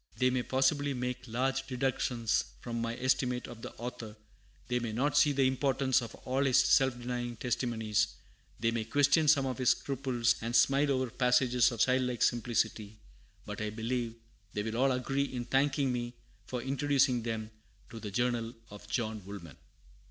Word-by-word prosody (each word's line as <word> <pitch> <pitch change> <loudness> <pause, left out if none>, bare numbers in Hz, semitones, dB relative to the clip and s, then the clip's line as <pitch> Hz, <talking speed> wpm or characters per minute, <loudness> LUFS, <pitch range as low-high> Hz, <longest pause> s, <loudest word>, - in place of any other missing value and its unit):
They 130 0 +3
may 125 0 +1
possibly 135 +2 +1
make 125 0 -4
large 135 +3 -1
deductions 125 -3 0 0.2
from 115 -1 -4
my 115 0 -3
estimate 125 -1 0
of 120 -2 -10
the - - -7
author; 120 -2 -7 0.5
they 125 0 0
may 115 -2 -3
not 135 +6 0
see 150 - +5
the 135 -1 +2
importance 130 0 +1
of 115 -1 -7
all 130 +2 +1
his 135 -3 +3
self 130 -2 +4
denying 120 0 -4
testimonies; 110 -3 0 0.5
they 115 +2 +1
may 115 -1 -1
question 145 +6 +3
some 145 -2 +5
of 130 0 -3
his 130 - +3
scruples, 130 -4 +1
and 115 +1 -2
smile 140 +3 +4
over 130 -3 0
passages 125 -1 +3
of 115 -2 -3
childlike 125 -1 +2
simplicity; 110 -3 0 0.5
but - - -6
I 105 - -1
believe 115 +1 -3 0.4
they 105 - -2
will 110 +1 -3
all 135 +2 +3
agree 135 +2 0
in 125 -3 -5
thanking 135 +1 +1
me 120 0 -4 0.3
for 125 -2 -4
introducing 135 -2 +2
them 110 -1 -4 0.4
to 115 - -7
the 105 - -6
Journal 120 +2 -1 0.2
of 105 - -11
John 110 -4 -2
Woolman. 90 -7 -9
125 Hz, 170 wpm, -31 LUFS, 115-130 Hz, 0.5 s, see